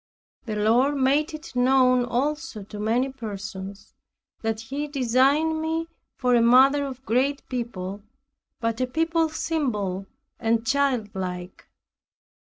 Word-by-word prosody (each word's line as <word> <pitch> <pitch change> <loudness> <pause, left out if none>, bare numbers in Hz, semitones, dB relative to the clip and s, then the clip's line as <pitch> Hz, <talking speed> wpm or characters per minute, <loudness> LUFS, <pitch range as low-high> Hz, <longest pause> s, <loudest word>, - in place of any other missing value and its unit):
The 215 - -2
Lord 235 +7 +3
made 280 +4 +2
it 310 -4 -11
known 255 0 +4
also 260 -2 -2
to 205 +1 -9
many 235 +5 +1
persons, 200 -5 -7 0.5
that 225 -1 -1
He 275 +6 -4
designed 285 +4 +2
me 325 +1 -2 0.3
for 250 -2 +2
a 240 - +5
mother 265 +4 +5
of 265 -1 -8
great 270 +5 0
people, 205 -6 -4 0.6
but 230 +1 -1
a 255 - +1
people 325 +4 +1
simple 210 - -2 0.3
and 225 0 +1
childlike. 205 -9 -2
250 Hz, 120 wpm, -25 LUFS, 220-280 Hz, 0.6 s, a